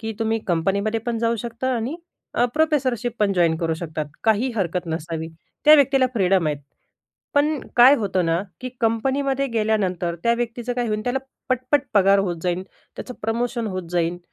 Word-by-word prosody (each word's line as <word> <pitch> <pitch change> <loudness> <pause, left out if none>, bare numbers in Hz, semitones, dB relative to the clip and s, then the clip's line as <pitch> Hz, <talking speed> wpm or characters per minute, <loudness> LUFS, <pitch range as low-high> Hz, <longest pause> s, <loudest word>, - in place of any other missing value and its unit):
की 225 0 -4
तुम्ही 225 0 0
कंपनीमध्ये 200 +6 +1
पण 235 -1 -1
जाऊ 230 0 +1
शकता 240 +3 -3
आणि 245 +8 -3 0.4
अ, 240 - +3
प्रोफेसरशिप 265 -7 +1
पण 205 -2 +2
जॉइन 170 -3 +3
करू 165 -1 -1
शकतात 160 -2 -4 0.2
काही 225 +4 +2
हरकत 180 -2 -1
नसावी. 160 0 -4 0.4
त्या 305 +1 +9
व्यक्तीला 270 -2 +4
फ्रीडम 190 -4 +2
आहेत. 150 -1 0 0.8
पण 295 0 +2 0.2
काय 250 +3 +8
होतं 190 -4 0
ना 165 +2 +1 0.2
की 255 - -4
कंपनीमध्ये 270 +4 +1
गेल्यानंतर, 195 -6 0
त्या 235 0 +3
व्यक्तीचं 240 +1 -3
काय 245 -1 -1
होईल, 215 0 -1
त्याला 250 +2 0 0.3
पट-पट 255 +2 +1
पगार 195 0 +5
होत 180 -3 0
जाईल, 180 0 -1 0.3
त्याचं 250 - -7
प्रमोशन 235 +1 -1
होत 185 -3 -5
जाईल. 175 0 0
225 Hz, 170 wpm, -22 LUFS, 180-250 Hz, 0.8 s, त्या